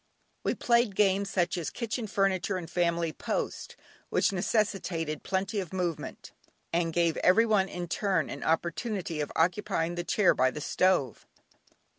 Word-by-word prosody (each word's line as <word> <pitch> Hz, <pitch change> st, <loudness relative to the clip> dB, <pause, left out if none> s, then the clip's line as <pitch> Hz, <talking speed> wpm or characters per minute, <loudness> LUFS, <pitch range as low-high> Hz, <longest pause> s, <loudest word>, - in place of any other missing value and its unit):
We -, -, 0 dB
played 235 Hz, -4 st, +2 dB
games 200 Hz, -1 st, +2 dB
such 175 Hz, -1 st, 0 dB
as 165 Hz, -, -3 dB
"Kitchen 235 Hz, -1 st, -4 dB
Furniture" 195 Hz, -1 st, 0 dB
and 175 Hz, -3 st, -6 dB
"Family 170 Hz, -2 st, 0 dB
Post" -, -, -3 dB, 0.3 s
which -, -, +2 dB
necessitated 185 Hz, -6 st, -1 dB
plenty 195 Hz, +2 st, -1 dB
of 185 Hz, -4 st, -5 dB
movement, 175 Hz, -4 st, -4 dB, 0.4 s
and 170 Hz, -1 st, +1 dB
gave 170 Hz, -1 st, +1 dB
every 215 Hz, +6 st, +5 dB
one 205 Hz, -4 st, +2 dB
in 175 Hz, -1 st, -5 dB
turn 185 Hz, -3 st, 0 dB
an 140 Hz, -, -7 dB
opportunity 170 Hz, 0 st, -1 dB
of 145 Hz, -, -3 dB
occupying 175 Hz, 0 st, +1 dB
the 175 Hz, 0 st, -3 dB
chair 205 Hz, +2 st, +3 dB
by 130 Hz, -, +3 dB
the 140 Hz, -, -6 dB
stove. 165 Hz, -5 st, +1 dB
180 Hz, 150 wpm, -29 LUFS, 165-200 Hz, 0.4 s, every